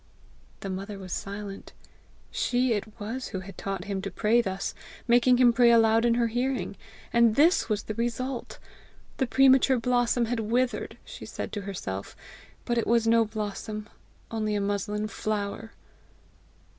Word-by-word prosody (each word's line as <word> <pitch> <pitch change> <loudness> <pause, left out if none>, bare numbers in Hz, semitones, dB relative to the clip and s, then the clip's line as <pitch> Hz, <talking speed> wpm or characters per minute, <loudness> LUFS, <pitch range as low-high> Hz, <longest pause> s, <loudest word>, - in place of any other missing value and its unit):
The 195 - -5
mother 195 +2 -5
was 185 -2 -7
silent: 200 0 -6 0.6
she 245 0 +1
it 210 0 -5
was 230 +5 -4
who 190 - -5
had 195 +1 -10
taught 195 -2 -4
him 195 0 -3
to 195 - -4
pray 220 +5 +2
thus 195 -3 -3 0.3
making 245 +1 +5
him 245 -1 +6
pray 240 0 +5
aloud 225 0 +5
in 235 -1 +3
her 240 0 +2
hearing! 245 0 -1 0.4
and 235 -2 +5
this 320 -2 +4
was 210 -1 0
the 215 - -4
result! 240 +3 -3 0.6
The 265 - +1
premature 265 0 +5
blossom 245 0 +2
had 235 +1 -2
withered! 240 +3 -1
she - - -9
said - - -5
to 205 - -4
herself. 100 - -5 0.5
But 240 -1 +1
it - - -2
was 230 0 +3
no 230 0 +4
blossom, 215 0 -5 0.4
only 215 -2 -1
a - - +1
muslin 205 +1 -1
flower! 215 +1 -3
225 Hz, 155 wpm, -27 LUFS, 205-240 Hz, 0.6 s, him